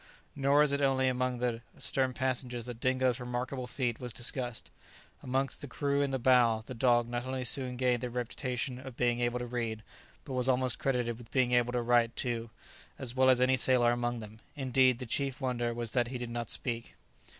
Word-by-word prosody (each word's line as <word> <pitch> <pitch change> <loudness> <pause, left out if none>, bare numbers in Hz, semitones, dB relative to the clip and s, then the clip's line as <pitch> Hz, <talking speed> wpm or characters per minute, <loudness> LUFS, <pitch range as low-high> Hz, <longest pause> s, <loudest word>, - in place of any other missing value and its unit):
Nor 140 +1 +4
as 150 - +2
it 140 0 0
only 135 -1 +2
among 125 0 0
the 120 -1 -1 0.2
stern 130 -1 0
passengers 125 -2 -2
that 120 -2 -7
Dingo's 130 0 +1
remarkable 125 +1 -4
feat 125 -2 -2
was 125 -1 -5
discussed; 120 +1 -2 0.5
amongst 130 0 -1
the 145 - -4
crew 140 +2 0
in 140 - +1
the 135 - -1
bow 120 -3 +4
the 130 - -7
dog 120 -1 +3
not 120 +1 -4
only 130 -1 -2
soon 125 0 0
gained 125 -2 +1
the 125 - -3
reputation 125 +1 -3
of 130 -2 -10
being 120 -1 +1
able 120 0 0
to 125 - -4
read, 115 -3 -3 0.4
but 135 - -6
was 130 0 +2
almost 130 -2 +2
credited 120 -3 -1
with 115 -2 -13
being 125 +2 +2
able 120 0 +2
to 120 -1 0
write 120 -1 +3
too, 115 -2 -2 0.5
as 125 -2 -2
well 130 0 +4
as 130 -1 +5
any 130 +1 +4
sailor 125 -2 +4
among 120 0 -1
them; 110 -1 -10 0.2
indeed 130 -2 +3
the 125 - -6
chief 135 +2 -1
wonder 120 -3 -1
was 115 -1 -3
that 120 -2 +1
he 125 +1 -4
did 120 -1 -5
not 120 -1 -4
speak. 115 -2 -1
125 Hz, 205 wpm, -31 LUFS, 120-130 Hz, 0.5 s, as